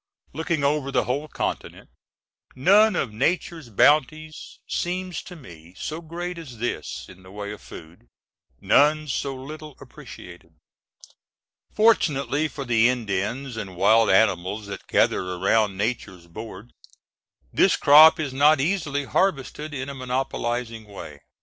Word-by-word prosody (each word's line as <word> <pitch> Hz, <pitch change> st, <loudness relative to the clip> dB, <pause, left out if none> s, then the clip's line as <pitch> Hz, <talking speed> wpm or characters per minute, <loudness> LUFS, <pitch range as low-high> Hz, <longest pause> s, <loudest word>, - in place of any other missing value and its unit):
Looking 160 Hz, 0 st, -2 dB
over 140 Hz, -1 st, 0 dB
the 125 Hz, -2 st, +1 dB
whole 140 Hz, +5 st, -3 dB
continent, -, -, -5 dB, 0.6 s
none 205 Hz, +11 st, +4 dB
of 110 Hz, -, -2 dB
Nature's 165 Hz, +2 st, -2 dB
bounties 155 Hz, +6 st, +1 dB
seems 180 Hz, -1 st, -3 dB
to 180 Hz, -, -11 dB
me 85 Hz, -, -14 dB
so 160 Hz, +2 st, -5 dB
great 170 Hz, +2 st, -6 dB
as 130 Hz, -8 st, -11 dB
this 120 Hz, +2 st, -4 dB
in 95 Hz, 0 st, -15 dB
the 95 Hz, -, -16 dB
way 100 Hz, +1 st, -7 dB
of 105 Hz, -, -10 dB
food, 80 Hz, -6 st, -13 dB, 0.5 s
none 155 Hz, +1 st, +3 dB
so 135 Hz, 0 st, -3 dB
little 150 Hz, +2 st, -9 dB
appreciated. 85 Hz, -2 st, -13 dB, 1.2 s
Fortunately 155 Hz, -9 st, +2 dB
for 140 Hz, -2 st, -7 dB
the 120 Hz, -1 st, +3 dB
Indians 120 Hz, +2 st, -3 dB
and 100 Hz, -5 st, -7 dB
wild 110 Hz, +5 st, +4 dB
animals 95 Hz, +1 st, +2 dB
that 100 Hz, -1 st, -9 dB
gather -, -, +2 dB
around 100 Hz, +2 st, +1 dB
Nature's 100 Hz, -5 st, -3 dB
board, 105 Hz, +4 st, -10 dB, 0.8 s
this -, -, +4 dB
crop 155 Hz, +3 st, +7 dB
is 145 Hz, -4 st, -3 dB
not 145 Hz, +2 st, +4 dB
easily 145 Hz, -3 st, -1 dB
harvested 150 Hz, -, -1 dB
in 135 Hz, -2 st, -5 dB
a 140 Hz, -, -6 dB
monopolizing 125 Hz, -3 st, -3 dB
way. 85 Hz, -8 st, -10 dB
130 Hz, 130 wpm, -24 LUFS, 105-155 Hz, 1.2 s, crop